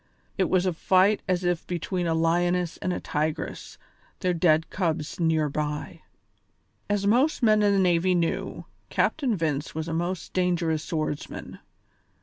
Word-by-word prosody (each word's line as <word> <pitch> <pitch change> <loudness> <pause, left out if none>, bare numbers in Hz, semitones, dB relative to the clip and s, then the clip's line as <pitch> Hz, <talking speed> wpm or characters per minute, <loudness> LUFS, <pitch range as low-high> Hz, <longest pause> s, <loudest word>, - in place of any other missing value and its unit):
It 190 -3 +1
was 185 0 +2
a 185 - +1
fight 190 +5 +3
as 185 -1 0
if 175 -2 -1
between 175 0 -2
a 165 - +1
lioness 175 +1 +1
and 185 - -2
a - - -2
tigress, 155 +1 -3 0.4
their 180 -1 +1
dead 165 -2 +2
cubs 160 -5 -2
near 160 -2 +2
by. 150 +1 -4 0.9
As 205 -1 0
most 250 +7 +2
men 215 -2 +5
in 205 -1 +4
the 200 - +2
navy 180 0 +3
knew, 170 -1 -2 0.2
Captain 265 -7 +1
Vince 155 -3 -2
was 160 0 -3
a 165 - -3
most 175 +2 -3
dangerous 170 -4 0
swordsman. 155 -4 -4
175 Hz, 150 wpm, -26 LUFS, 160-185 Hz, 0.9 s, men